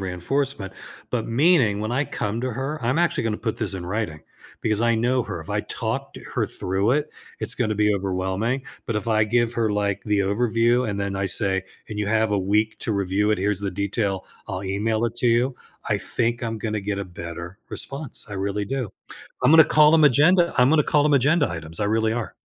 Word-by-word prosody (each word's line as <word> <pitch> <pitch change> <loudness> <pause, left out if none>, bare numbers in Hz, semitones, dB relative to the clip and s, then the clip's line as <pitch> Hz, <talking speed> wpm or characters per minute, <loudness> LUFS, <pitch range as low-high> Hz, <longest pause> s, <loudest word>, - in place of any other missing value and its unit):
reinforcement, 95 +4 -2 0.4
but 115 -3 -2
meaning, 125 - +3
when 110 +3 -3
I 140 +4 +1
come 110 -1 -3
to 130 - -2
her, 135 +2 -4
I'm 130 +7 +1
actually 175 -7 +1
gonna 110 -2 -1
put 110 0 -3
this 105 -4 -2
in 90 -2 -6
writing, 95 -6 -3 0.4
because 110 0 +1
I 115 -1 +3
know 125 +2 +1
her. 105 -6 -5
If 80 - -11
I - - 0
talked - - -4 0.2
her - - +1
through 95 +5 -1
it, 150 +1 0 0.3
it's - - 0
gonna 110 -4 -1
be 105 0 +3
overwhelming. 95 +6 -1 0.2
But 115 - -2
if 105 - -3
I 110 -1 +3
give 120 +2 +1
her, 115 -2 +1
like, 100 -1 -1
the 105 -1 +1
overview 115 +4 +2
and 100 -1 -3
then 100 -1 -2
I 95 0 -1
say, 95 -1 +2 0.3
"And 105 -1 -6
you 105 - -1
have 110 -1 +2
a 100 - +2
week 105 +3 +1
to 110 - -1
review 100 +2 +1
it, 105 - +1
here's 100 +1 0
the 100 -1 -2
detail, 100 0 -2 0.2
I'll 95 0 -4
email 110 +4 0
it 115 0 -2
to 120 - +2
you." 120 +3 +2 0.3
I - - +2
think 120 +1 -1
I'm 115 -1 -3
gonna 105 -1 -2
get 100 0 -3
a 100 - -3
better 85 +2 -8
response, 140 -1 -4
I 105 - -9
really 100 +1 -2
do. 125 -1 -3 0.5
I'm 150 - +6
gonna 160 -1 +9
call 150 +1 +5
'em 160 - +5
agenda 170 +6 +5
I'm 125 +1 +6
gonna 155 -1 +5
call 150 0 +2
them 150 -1 +3
agenda 145 +1 +3
items, 80 -1 -6
I - - +1
really 110 +1 +1
are. 120 -1 -4
110 Hz, 220 wpm, -23 LUFS, 100-125 Hz, 0.5 s, gonna